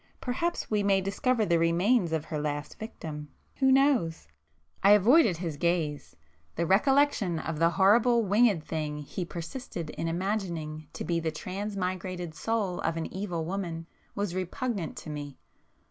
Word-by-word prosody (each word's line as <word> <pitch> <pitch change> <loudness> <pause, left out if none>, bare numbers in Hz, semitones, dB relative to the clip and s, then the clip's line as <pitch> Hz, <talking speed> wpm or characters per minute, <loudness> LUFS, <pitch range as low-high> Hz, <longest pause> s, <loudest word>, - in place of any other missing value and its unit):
—perhaps 335 +6 -2
we 210 -1 +2
may 200 -1 +3
discover 215 +4 +1
the 170 -3 +2
remains 175 +4 +3
of 160 -1 -1
her 155 -2 -3
last 145 0 -4
victim,——who 160 - -3
knows!" 260 - +3 0.5
I 200 +2 +7
avoided 215 - +5
his 165 -4 -4
gaze;—the 145 - -3
recollection 220 - +3
of 160 0 -4
the 165 0 +5
horrible 230 +6 +4
winged 205 -4 +3
thing 155 -2 -3
he 150 +5 -5
persisted 170 - -6
in 165 - -4
imagining 170 -4 -3
to - - -5
be 170 -1 0
the 165 -1 -1
transmigrated 185 -1 -4
soul 200 +1 -1
of 165 0 -1
an 165 - -4
evil 180 -4 -3
woman, 170 -3 -4 0.3
was 200 -3 -2
repugnant 185 - -3
to 155 - -7
me. 145 -2 -6
180 Hz, 145 wpm, -28 LUFS, 160-210 Hz, 0.5 s, I